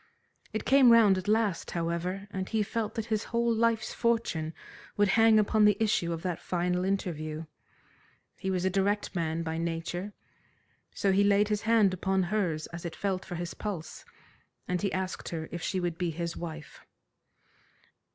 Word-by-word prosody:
It 220 - -3
came 265 -2 +6
round 210 -5 +6
at 185 - -8
last, 215 -4 +1
however, 175 +4 -2
and 190 -1 -4
he 220 -1 +1
felt 220 0 -3
that 225 - -2
his 215 0 -1
whole 235 0 +1
life's 225 -1 +1
fortune 230 -10 0 0.5
would 205 -1 +3
hang 225 +2 +5
upon 215 0 +3
the 210 -1 +4
issue 215 -6 +1
of 165 -1 -4
that 180 -3 -2
final 180 0 -1
interview. 165 -5 -2 0.9
He 190 - -4
was 185 -1 0
a 190 - +2
direct 200 +2 0
man 165 -2 -1
by 160 0 -3
nature, 170 +4 -3 0.8
so 195 - +1
he 195 +1 +4
laid 205 +1 +3
his 210 0 0
hand 220 -4 +4
upon 190 +1 0
hers 175 -5 -1
as 170 - -6
it 170 -2 -5
felt 195 -2 -2
for 175 - -7
his 175 +1 -4
pulse, 190 -7 -6 0.6
and 180 -1 -1
he 200 - 0
asked 185 0 -3
her 160 -2 -4
if 170 - -5
she 190 - -1
would 175 -2 -3
be 175 -1 0
his 170 +1 -4
wife. 160 -3 -8
190 Hz, 175 wpm, -29 LUFS, 170-210 Hz, 0.9 s, came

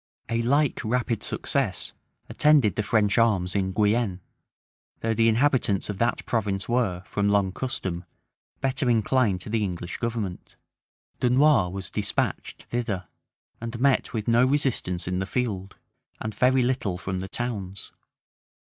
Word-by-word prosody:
A 115 0 +1
like 140 +4 +2
rapid 120 -1 0
success - - -1 0.3
attended 145 - +4
the - - 0
French 105 0 +2
arms 100 -6 +2
in 95 -1 +1
Guienne; 105 -1 +1 0.8
though 115 0 +1
the 115 +1 +4
inhabitants 115 -5 +2
of 100 - -8
that 120 +1 0
province 100 -4 -1
were, 115 -7 0
from 100 0 0
long 100 -2 +2
custom, 90 -6 -4 0.6
better 135 0 0
inclined 115 -4 +2
to - - -8
the 115 -1 +1
English 90 -2 -4
government. 115 -6 -4 0.6
Dunois 125 -5 +4
was 95 0 -5
despatched 100 -1 -2
thither, 105 -8 -3 0.5
and 115 0 -5
met 135 0 +2
with 110 -3 -3
no 120 +1 +5
resistance 130 - 0
in 90 0 -1
the 95 - -2
field, 100 -4 -2 0.4
and 110 0 -4
very 130 +4 +3
little 120 -8 0
from 95 0 -4
the 95 - -5
towns. 100 -5 -5
110 Hz, 140 wpm, -26 LUFS, 95-125 Hz, 0.8 s, no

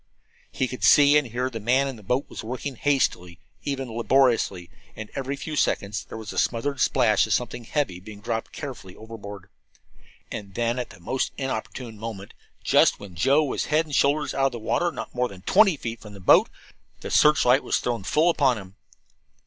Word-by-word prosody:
He 130 - -1
could 125 - -7
see 145 0 +7
and 150 -3 +3
hear 120 +2 -3
that 120 -3 -6
the - - -13
man 130 +4 +3
in 135 - -5
the 110 - -13
boat 125 +7 -1
was - - -8
working 130 +4 -5
hastily, 110 -11 0 0.2
even 135 -2 -3
laboriously; 115 -8 +2 0.2
and 110 - -8
every 135 +1 -3
few 155 +2 -6
seconds 105 -7 0
there - - -9
was 110 -1 -7
the - - -1
smothered 140 +4 -1
splash - - +3
of - - 0
something 120 - -2
heavy 120 - -2
being 100 +2 -11
dropped 115 +1 -4
carefully 125 -11 -8
overboard. 100 -4 -10 0.8
And 100 -2 -7
then, 120 +1 0
at 125 - -4
the - - -14
most 130 +10 -2
inopportune 120 -3 -5
moment, 105 -3 -7 0.3
just - - +4
when 100 -3 -10
Joe 135 - +3
was 140 - -2
head 155 +2 +1
and 150 - -10
shoulders 145 +2 +2
out 135 0 +2
of - - -3
the - - -4
water, 170 +10 0
not - - -7
more 125 0 0
than 95 -2 -13
twenty 195 - +4
feet 115 -3 -5
away - - -29
from 105 -1 -11
the - - -11
boat, 90 - +5 0.5
the - - -6
searchlight 140 -3 +4
was - - +1
thrown 120 -4 -2
full 155 - +3
upon 135 -7 +2
him. 95 -2 -11
125 Hz, 205 wpm, -25 LUFS, 105-140 Hz, 0.8 s, see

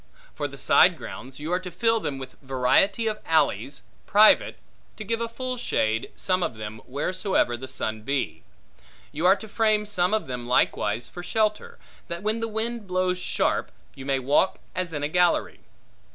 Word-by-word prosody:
For - - -3
the - - -11
side - - +5
grounds, 130 +2 -9
you 155 +4 -3
are 180 - +2
to 185 0 -7
fill 225 +4 +1
them 145 -9 -3
with 130 -1 -9
variety 135 - +2
of 215 -1 -1
alleys, 145 -3 +1 0.2
private, 215 +1 +5 0.4
to 215 - -5
give 230 +2 -2
a 230 - 0
full 255 +2 -4
shade, 110 - 0
some 185 -1 0
of 125 - -1
them, 110 0 -7
wheresoever 180 - 0
the 130 +2 -7
sun 110 -4 -3
be. 135 +4 -2 0.7
You 160 +4 +1
are 190 - +7
to 220 - -10
frame 215 -1 +2
some 195 -1 +1
of 220 - -1
them, 125 -2 -5
likewise, 115 -2 +1
for 175 - -8
shelter, 215 +3 -1 0.3
that 170 +2 -5
when 215 +2 0
the 225 - -1
wind 225 0 -3
blows 185 0 0
sharp - - 0 0.2
you 135 0 -9
may 135 -1 +2
walk 140 +8 +2 0.2
as 180 -2 -2
in 150 -2 -3
a - - +1
gallery. 175 +2 +1
180 Hz, 180 wpm, -25 LUFS, 135-215 Hz, 0.7 s, are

